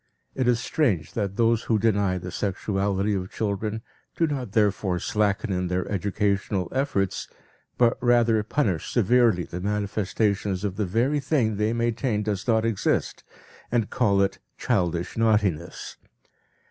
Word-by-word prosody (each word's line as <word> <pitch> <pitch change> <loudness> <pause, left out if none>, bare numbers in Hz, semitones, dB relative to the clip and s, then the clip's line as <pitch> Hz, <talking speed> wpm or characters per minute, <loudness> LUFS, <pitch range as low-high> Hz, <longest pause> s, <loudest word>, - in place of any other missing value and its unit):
It 130 -2 -1
is 120 -1 +3
strange 110 - 0
that 100 -3 -2
those 115 -1 +2
who 110 - +2
deny 100 -3 +1
the 90 0 -6
sexuality 100 +1 -1
of 95 -1 -3
children, 110 +1 -2 0.3
do 165 - +3
not 130 -9 -4
therefore 100 -4 +1
slacken 105 +1 0
in 90 -1 -1
their 90 +1 -1
educational 100 -1 -1
efforts 100 -9 -1 0.5
but 120 -1 +3
rather 120 -3 +3
punish 105 - -1
severely 120 -4 +3
the 90 +1 -7
manifestations 100 -1 -1
of 100 -3 -2
the 105 -2 -1
very 125 +10 +1
thing 125 -7 0
they 105 +1 +1
maintain 115 -1 0
does 105 -1 -3
not 110 -1 +3
exist, 115 -4 -1 0.5
and 115 -3 0
call 100 -5 +3
it 100 0 -2 0.2
"childish 90 -6 -1
naughtiness." 105 -7 0
105 Hz, 140 wpm, -25 LUFS, 95-115 Hz, 0.5 s, is